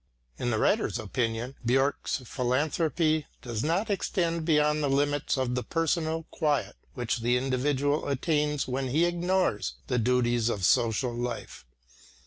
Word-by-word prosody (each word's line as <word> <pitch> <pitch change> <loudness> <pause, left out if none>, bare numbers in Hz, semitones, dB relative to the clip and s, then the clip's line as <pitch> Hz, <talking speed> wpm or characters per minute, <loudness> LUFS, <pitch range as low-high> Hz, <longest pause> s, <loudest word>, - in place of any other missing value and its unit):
In 120 - -1
the 110 - +1
writer's 210 - +1
opinion 115 +2 -2
Björck's 135 +2 +1
philanthropy 155 +5 0 0.2
does 115 -3 -3
not 185 +7 0
extend 170 -4 -1
beyond 150 -1 +3
the 145 - +1
limits 145 +1 +1
of 130 -2 0
the 125 - 0
personal 165 +1 -1
quiet 150 -4 0 0.2
which 120 -1 -1
the 120 +2 +2
individual 135 +3 0
attains 150 +1 0
when 130 +1 -2
he 155 +7 +2
ignores 175 - 0
the 125 -2 0
duties 120 -1 +2
of 100 -5 -1
social 120 +1 +2
life. 120 - -5
135 Hz, 135 wpm, -28 LUFS, 120-155 Hz, 0.2 s, beyond